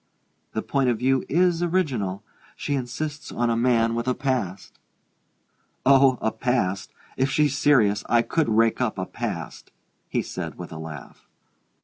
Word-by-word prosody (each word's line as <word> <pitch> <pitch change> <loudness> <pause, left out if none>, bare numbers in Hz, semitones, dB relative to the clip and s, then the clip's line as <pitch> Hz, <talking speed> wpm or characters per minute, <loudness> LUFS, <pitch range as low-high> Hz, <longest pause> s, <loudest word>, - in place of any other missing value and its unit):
The - - -2
point 135 -2 +1
of 120 - +1
view 130 +2 +2
is 175 +1 +2
original 135 - -1 0.3
she 145 - -3
insists 145 +3 -4
on 120 -1 0
a - - +1
man 115 -1 +2
with 115 +1 -2
a 125 - +1
past!" 125 -10 -3 1.1
"Oh, 135 -1 +6
a 110 - +2
past 110 -5 -1 0.3
if 130 +1 +2
she's 145 0 +2
serious 110 -9 +3
I 120 0 +4
could 160 -1 0
rake 115 +2 +3
up 115 -5 0
a 95 - -2
past!" - - -6 0.4
he - - 0
said - - -6
with - - -8
a 80 - -7
laugh. 80 -4 -10
125 Hz, 155 wpm, -24 LUFS, 110-140 Hz, 1.1 s, Oh